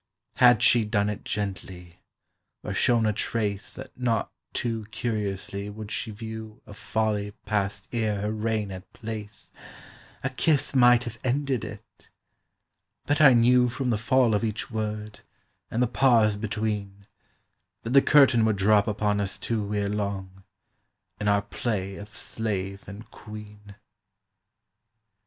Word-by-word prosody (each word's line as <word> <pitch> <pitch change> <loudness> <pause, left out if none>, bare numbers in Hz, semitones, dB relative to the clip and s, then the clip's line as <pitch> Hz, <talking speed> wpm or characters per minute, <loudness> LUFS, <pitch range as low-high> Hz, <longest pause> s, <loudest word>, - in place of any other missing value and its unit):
Had 125 -2 +6
she 120 -2 +6
done 105 -1 0
it 105 - -7
gently, 95 -3 -5 0.6
or - - -4
shown 120 -2 +3
a 105 - +2
trace 105 -2 -2
That - - -10
not 120 -3 -1 0.2
too 115 -3 -2
curiously 100 -2 -3
would 105 0 -8
she - - -2
view 110 +1 -8
A - - -11
folly 105 -1 -2
passed 100 -1 -1
ere 110 -4 -1
her 105 +1 -1
reign 110 -2 -2
had 95 +1 -9
place, 110 -2 -7 0.7
A 135 - -1
kiss 145 +2 +1
might 125 -2 +6
have 115 -3 -7
ended 135 -1 0
it. - - -11 1.0
But 145 +2 +1
I 135 -4 +9
knew 125 +1 +5
From 125 0 -2
the 110 - +1
fall 120 0 +3
of 105 - +1
each 110 +1 -3
word, 105 -1 -4 0.5
and 120 +2 +1
the - - +2
pause 115 -4 +4
between, 105 -2 -3 0.8
That 115 - -4
the 135 - +8
curtain 135 -6 +5
would 110 -2 +2
drop 105 +2 +4
upon 105 -1 0
us 100 -1 -2
two 105 -3 -2
Ere 100 -1 0
long, 100 -2 -4 0.8
in 105 - -2
our 100 -1 +3
play 100 -2 -3
of 105 +1 -9
slave 100 -1 -3
and 100 +3 -9
queen. 105 -1 -11
105 Hz, 140 wpm, -26 LUFS, 100-115 Hz, 1.0 s, I